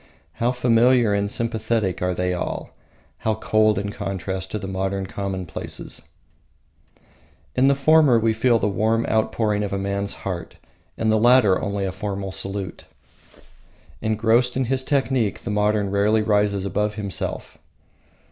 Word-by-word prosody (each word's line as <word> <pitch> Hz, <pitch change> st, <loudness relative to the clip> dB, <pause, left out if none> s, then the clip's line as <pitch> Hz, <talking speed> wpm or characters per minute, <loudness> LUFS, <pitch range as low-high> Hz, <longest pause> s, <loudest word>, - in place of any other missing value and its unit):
How 120 Hz, +1 st, +3 dB
familiar 120 Hz, -2 st, +3 dB
and 100 Hz, 0 st, 0 dB
sympathetic 110 Hz, -3 st, -1 dB
are 90 Hz, 0 st, 0 dB
they 90 Hz, 0 st, 0 dB
all; 90 Hz, -, -4 dB, 0.5 s
how 110 Hz, -1 st, 0 dB
cold 110 Hz, -1 st, +2 dB
in 100 Hz, +1 st, -2 dB
contrast 95 Hz, +1 st, -4 dB
the 95 Hz, -, -6 dB
modern 95 Hz, 0 st, -2 dB
commonplaces! 95 Hz, -3 st, -5 dB, 1.5 s
In 130 Hz, +1 st, +4 dB
the 140 Hz, -, +4 dB
former 145 Hz, -2 st, +5 dB
we 115 Hz, 0 st, +2 dB
feel 115 Hz, +1 st, +3 dB
the 105 Hz, -, 0 dB
warm 110 Hz, +3 st, +1 dB
outpouring 110 Hz, -1 st, 0 dB
of 105 Hz, -, -3 dB
a 100 Hz, -, -1 dB
man's 100 Hz, +1 st, -2 dB
heart; 85 Hz, -4 st, -5 dB, 0.4 s
in 110 Hz, -, 0 dB
the 110 Hz, 0 st, +3 dB
latter 120 Hz, -5 st, +5 dB
only 100 Hz, -1 st, -2 dB
a 95 Hz, -, -2 dB
formal 95 Hz, 0 st, -4 dB
salute. 95 Hz, -1 st, -5 dB, 1.2 s
Engrossed 115 Hz, +3 st, +2 dB
in 130 Hz, -, +1 dB
his 130 Hz, +2 st, 0 dB
technique, 130 Hz, -6 st, 0 dB
the 115 Hz, -, -4 dB
modern 105 Hz, -1 st, +1 dB
rarely 105 Hz, +2 st, +2 dB
rises 105 Hz, -2 st, +1 dB
above 105 Hz, +1 st, -1 dB
himself. 100 Hz, -5 st, -4 dB
105 Hz, 140 wpm, -22 LUFS, 100-115 Hz, 1.5 s, former